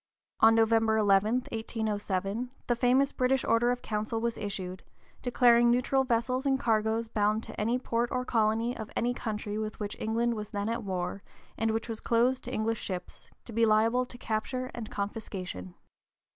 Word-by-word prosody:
On 225 0 +7
November 225 -1 +3
11, 210 +4 +3
1807, 215 -1 -2 0.2
the 240 - +1
famous 255 +3 +3
British 260 +1 +1
Order 230 +1 +3
in 245 - +1
Council 220 -1 -3
was 235 0 -1
issued, 185 -2 -5 0.4
declaring 240 -1 +5
neutral 250 +2 +2
vessels 255 +1 0
and 270 -1 +2
cargoes 225 -1 +1
bound 215 0 +1
to - - -6
any 230 +4 +1
port 240 -1 -1
or 250 0 -1
colony 225 +1 +1
of 220 -2 -6
any 240 +1 +1
country 210 -3 -4
with 215 0 -4
which 205 -1 -3
(p. - - -12
042) 220 - -3
England 235 +1 +1
was 210 -2 -5
then 205 +1 -2
at 230 0 -2
war, 185 0 -3 0.3
and 225 - 0
which 225 +1 -1
was 225 -2 -4
closed 245 +3 +2
to 250 - -5
English 225 -1 -1
ships, 180 -2 -6 0.2
to 235 - -9
be 230 +1 +2
liable 225 +3 +3
to 245 - -10
capture 255 +3 -3
and 225 -3 -6
confiscation. 190 - -5
225 Hz, 180 wpm, -29 LUFS, 215-240 Hz, 0.4 s, On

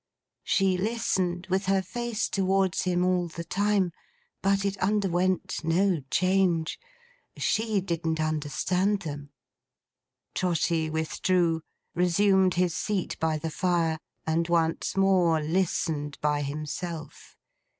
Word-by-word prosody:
She 190 -2 +2
listened, 185 -5 -1
with 190 0 +1
her 195 0 +2
face 235 +2 -2
towards 190 -1 +1
him 180 0 +1
all 180 -1 +1
the 170 0 -7
time. 195 +1 +1 0.5
But 195 +1 +2
it 200 0 0
underwent 185 -2 0
no 170 +1 +2
change. 185 -3 +1 0.6
She 220 -2 +1
didn't 165 -3 -2
understand 155 +6 0
them. 145 -2 -6 1.0
Trotty 165 -2 0
withdrew, 165 +1 +1 0.3
resumed 185 +2 +3
his 175 -2 +1
seat 200 -1 -2
by 160 -1 +1
the 160 +1 -4
fire, 165 -2 0 0.3
and 165 +1 +1
once 165 +1 0
more 185 -4 +4
listened 155 -3 -1
by 150 -1 +1
himself. 155 +2 -6
180 Hz, 110 wpm, -27 LUFS, 160-195 Hz, 1.0 s, more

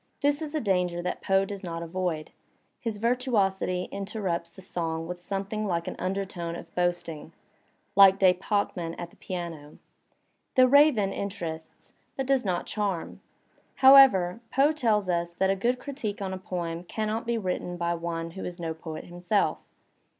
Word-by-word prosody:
This 290 +1 +2
is 310 0 -4
a - - +2
danger 180 -6 0
that 180 - -3
Poe 195 0 +2
does 200 0 -7
not 170 -1 -4
avoid; 170 -2 -3 0.5
his 225 -3 -3
virtuosity 205 -6 +1
interrupts 195 -4 -3
the 190 +3 -14
song 165 -3 -3
with 180 0 -5
something 200 +3 -3
like 170 -3 -1
an - - -4
undertone 185 -3 -3
of 170 -1 -10
boasting, 175 -3 -2 0.6
like 195 -1 +8
De 185 -2 +6
Pachmann 180 -3 -2
at 170 -1 -7
the - - -21
piano. 170 -5 -6 0.8
"The 255 -1 +7
Raven" 255 -8 +5
interests, 165 -5 -6 0.2
but 270 - -1
does 270 -1 +2
not 180 -4 -1
charm. 200 -5 -3 0.5
However, 260 -9 +7
Poe 275 +3 +4
tells 225 -10 +1
us 170 -1 -1
that 190 +2 +2
a - - +1
good 240 +6 +1
critique 250 -6 -5
on 190 -2 -3
a 190 - -5
poem 175 -2 -4
cannot 220 +4 -3
be 235 -1 +1
written 180 -3 -3
by 170 0 0
one 165 0 -4
who 190 - -7
is 175 0 -6
no 165 -1 -3
poet 160 0 -7
himself. 175 +4 0
190 Hz, 165 wpm, -27 LUFS, 170-215 Hz, 0.8 s, like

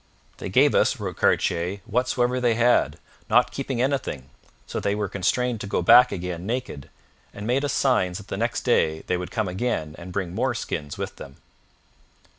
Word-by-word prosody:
'They - - -5
gave - - +4
us,' - - +2
wrote - - -4
Cartier, 90 +4 +1
'whatsoever 125 +1 0
they 120 -2 +2
had, 120 +1 +3 0.3
not 120 +3 +4
keeping 135 -3 -3
anything, 120 - -2 0.3
so - - -4
that - - -9
they 100 0 +1
were 105 -1 -1
constrained 115 +5 -1
to - - -5
go 90 - -1
back 125 +8 +7
again 90 -1 -4
naked, 115 - -4 0.5
and 105 - -7
made 125 +5 +1
us 145 - 0
signs 95 -10 +1
that 100 - -11
the - - -4
next 115 +4 -1
day 80 -10 +1
they 90 - 0
would 90 0 -4
come 110 -3 -1
again 90 -5 -2
and 90 +1 -9
bring 90 -2 -3
more 120 +4 0
skins 75 -9 -4
with - - -5
them.' 70 - -10
105 Hz, 190 wpm, -24 LUFS, 90-125 Hz, 0.5 s, back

